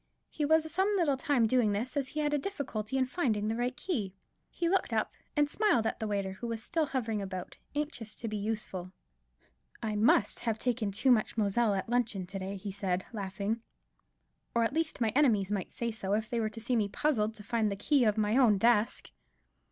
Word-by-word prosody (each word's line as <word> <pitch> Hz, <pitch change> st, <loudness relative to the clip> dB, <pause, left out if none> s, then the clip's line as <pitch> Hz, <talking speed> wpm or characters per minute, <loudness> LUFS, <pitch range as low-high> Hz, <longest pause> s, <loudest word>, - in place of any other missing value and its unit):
He 300 Hz, -, -1 dB
was 315 Hz, +1 st, +3 dB
some 380 Hz, +3 st, +2 dB
little 310 Hz, -7 st, +3 dB
time 260 Hz, -2 st, +2 dB
doing 225 Hz, -2 st, +3 dB
this, 235 Hz, +7 st, -2 dB
as 280 Hz, -2 st, 0 dB
he 305 Hz, +2 st, -3 dB
had 295 Hz, 0 st, 0 dB
a 295 Hz, -, +2 dB
difficulty 265 Hz, -, -3 dB
in 260 Hz, -, +3 dB
finding 235 Hz, -8 st, 0 dB
the 220 Hz, -, 0 dB
right 245 Hz, +2 st, -1 dB
key. 215 Hz, -, -2 dB, 0.3 s
He 340 Hz, -, -2 dB
looked 380 Hz, +2 st, +1 dB
up -, -, 0 dB, 0.2 s
and 295 Hz, 0 st, +4 dB
smiled 300 Hz, -, +2 dB
at -, -, -1 dB
the 220 Hz, -, -2 dB
waiter, 200 Hz, -2 st, -1 dB
who 190 Hz, +5 st, -6 dB
was 225 Hz, -1 st, -3 dB
still 325 Hz, 0 st, 0 dB
hovering 225 Hz, -6 st, -1 dB
about, 185 Hz, -2 st, -6 dB, 0.2 s
anxious 290 Hz, -7 st, -3 dB
to 230 Hz, -, -5 dB
be 215 Hz, -, -3 dB
useful. 205 Hz, -4 st, -3 dB, 0.9 s
"I 215 Hz, -1 st, -1 dB
must 210 Hz, -1 st, +3 dB
have 225 Hz, -3 st, -1 dB
taken 235 Hz, -4 st, -1 dB
too 255 Hz, +7 st, +3 dB
much 235 Hz, -1 st, +2 dB
Moselle 210 Hz, 0 st, +2 dB
at 190 Hz, -, -2 dB
luncheon 230 Hz, -5 st, 0 dB
to 195 Hz, +2 st, -6 dB
day," 190 Hz, +1 st, -4 dB
he 200 Hz, +1 st, -5 dB
said, 190 Hz, -2 st, -2 dB
laughing, 200 Hz, +2 st, -2 dB, 0.9 s
"or, 235 Hz, -, +4 dB
at 230 Hz, -, 0 dB
least, 320 Hz, -4 st, -1 dB
my 225 Hz, -, +3 dB
enemies 215 Hz, -7 st, +3 dB
might 195 Hz, -3 st, -2 dB
say 235 Hz, -1 st, -2 dB
so, 205 Hz, -3 st, -3 dB
if 215 Hz, +1 st, 0 dB
they 235 Hz, -, -1 dB
were 220 Hz, -1 st, 0 dB
to 225 Hz, -, -8 dB
see 235 Hz, +3 st, -1 dB
me 215 Hz, -3 st, +2 dB
puzzled 220 Hz, -4 st, 0 dB
to 210 Hz, -, -8 dB
find 220 Hz, -1 st, 0 dB
the -, -, -1 dB
key 265 Hz, +7 st, +2 dB
of 215 Hz, -1 st, +2 dB
my 215 Hz, +2 st, +2 dB
own 235 Hz, -6 st, +5 dB
desk." 230 Hz, +1 st, +2 dB
225 Hz, 215 wpm, -31 LUFS, 205-265 Hz, 0.9 s, own